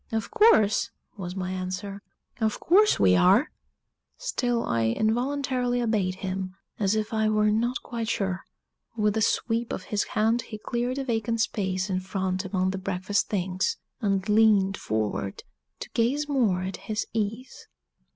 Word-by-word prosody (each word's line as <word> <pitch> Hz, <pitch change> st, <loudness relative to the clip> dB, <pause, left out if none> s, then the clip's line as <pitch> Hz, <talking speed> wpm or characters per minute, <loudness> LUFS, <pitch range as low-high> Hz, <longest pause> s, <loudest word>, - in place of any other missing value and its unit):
"Of 220 Hz, -1 st, -2 dB
course," 425 Hz, -, +4 dB, 0.3 s
was 180 Hz, -2 st, -6 dB
my 185 Hz, -1 st, -3 dB
answer, 185 Hz, +2 st, -4 dB, 0.4 s
"of 220 Hz, -2 st, 0 dB
course 415 Hz, +5 st, +4 dB
we 90 Hz, -1 st, +5 dB
are!" 195 Hz, -, +4 dB, 0.7 s
Still 245 Hz, -, -1 dB
I 115 Hz, -1 st, +1 dB
involuntarily 245 Hz, -, 0 dB
obeyed 210 Hz, -6 st, 0 dB
him, 185 Hz, 0 st, -3 dB, 0.2 s
as 200 Hz, 0 st, +2 dB
if 215 Hz, +1 st, -2 dB
I 220 Hz, -1 st, +2 dB
were 215 Hz, 0 st, +3 dB
not 235 Hz, +4 st, 0 dB
quite 230 Hz, -2 st, -4 dB
sure. 190 Hz, -4 st, -1 dB, 0.6 s
With 210 Hz, -1 st, +2 dB
a 220 Hz, -, +1 dB
sweep 230 Hz, +1 st, 0 dB
of -, -, -4 dB
his 205 Hz, -, +1 dB
hand 225 Hz, +2 st, +1 dB
he 230 Hz, -1 st, -8 dB
cleared 240 Hz, +4 st, -2 dB
a 275 Hz, -, -1 dB
vacant 230 Hz, -2 st, -1 dB
space 190 Hz, -4 st, -1 dB
in 185 Hz, -2 st, -1 dB
front 185 Hz, 0 st, -2 dB
among 185 Hz, -1 st, 0 dB
the 190 Hz, -, -4 dB
breakfast 190 Hz, +1 st, -1 dB
things, 190 Hz, -, -1 dB, 0.2 s
and 195 Hz, -2 st, 0 dB
leaned 210 Hz, -3 st, +4 dB
forward 105 Hz, -, -3 dB, 0.4 s
to -, -, -6 dB
gaze 270 Hz, +6 st, +1 dB
more 225 Hz, -11 st, +1 dB
at 190 Hz, +1 st, -4 dB
his 215 Hz, -1 st, -3 dB
ease. 225 Hz, +3 st, -4 dB
210 Hz, 155 wpm, -26 LUFS, 190-235 Hz, 0.7 s, we